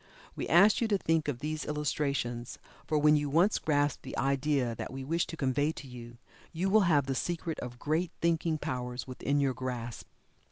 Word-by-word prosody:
We - - -4
ask 200 +6 +6
you 230 - +2
to 205 -2 +2
think 165 -4 0
of 135 -5 -3
these 155 +1 -3
illustrations, 140 -5 -2 0.3
for 155 - +1
when 150 +1 +5
you 145 -1 0
once 175 +9 +3
grasp 145 -2 +1
the 130 - -7
idea 135 -2 +1
that - - -6
we 135 0 -6
wish 165 +5 0
to 165 - -7
convey 145 +2 +1
to 140 - -9
you, 120 -1 -10 0.3
you 185 +4 -1
will 205 -4 +5
have 145 -4 +4
the 135 - -1
secret 165 +4 -3
of 120 -1 -7
great 160 +6 0
thinking 165 -1 +1
powers 125 -4 -4
within 140 +2 -1
your 135 -2 +2
grasp. 120 -2 -5
145 Hz, 195 wpm, -30 LUFS, 130-160 Hz, 0.3 s, ask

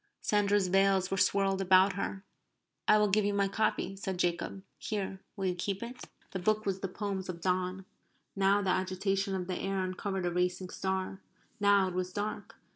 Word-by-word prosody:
Sandra's 205 -2 +2
veils 195 0 +3
were 195 - 0
swirled 195 0 +2
about 190 +1 +5
her. 195 0 -4 0.6
"I 215 - +7
will 210 0 +4
give 210 +2 +3
you 205 0 0
my 200 -1 +2
copy," 195 -1 0
said 190 -1 -4
Jacob. 175 +2 -1 0.2
"Here. 195 -2 -3
Will 195 -2 -3
you 185 - +1
keep 195 +4 -3
it?" 245 +2 -8 0.3
(The 190 - -3
book 215 +4 +1
was 195 -1 -1
the 195 - -2
poems 195 0 -4
of 175 -2 -4
Donne.) 185 +1 -1 0.5
Now 200 +1 +3
the 190 - +2
agitation 190 +1 0
of 185 -1 -2
the 185 0 -3
air 195 0 -1
uncovered 185 0 -3
a 175 - 0
racing 180 +1 -1
star. 190 0 -2 0.4
Now 200 -2 +4
it 185 - -4
was 180 0 -2
dark. 210 +2 -4
195 Hz, 190 wpm, -31 LUFS, 185-200 Hz, 0.6 s, I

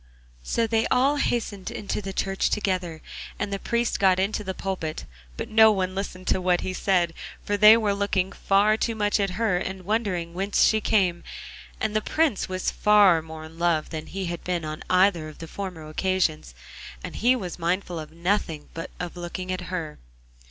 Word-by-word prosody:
So 230 - 0
they 225 0 +1
all 275 +3 +3
hastened 220 -8 -1
into 205 - -4
the 195 -1 -5
church 195 0 0
together 185 -6 -2 0.3
and 205 -1 -3
the 195 - -2
priest 235 +2 -1
got 190 -2 +4
into 205 +2 0
the 190 -1 -4
pulpit, 180 -5 -4 0.3
but - - -4
no 220 0 +6
one 185 -2 -1
listened 185 -1 -5
to 190 - +2
what 180 -1 +2
he 185 - -3
said, 180 -3 +1 0.3
for 205 - 0
they 210 +2 +8
were 210 -3 +1
looking 200 -2 0
far 205 +2 +2
too 230 0 -1
much 205 -1 +1
at 200 -1 +1
her 215 -5 +1
and 190 0 -5
wondering 190 -6 -1
whence 195 +3 +1
she 220 0 +3
came; 180 -6 +1 0.6
and 215 -1 -1
the 215 - +2
Prince 300 -7 0
was 185 0 -1
far 205 -6 +5
more 160 0 -9
in 160 +1 -12
love 170 -3 +1
than 155 -1 -5
he 195 0 -4
had 170 -1 -5
been 175 -3 -2
on 155 0 -5
either 180 -4 +3
of 155 - -13
the 165 - -8
former 180 -4 -6
occasions, 155 - -1 0.5
and - - -6
he 245 +3 +4
was 185 -7 -5
mindful 175 0 -1
of 155 -1 -8
nothing 170 -3 -2
but 165 - -6
of 175 -1 -5
looking 180 +1 -5
at 185 - -3
her. 165 -5 -4
190 Hz, 195 wpm, -25 LUFS, 170-210 Hz, 0.6 s, they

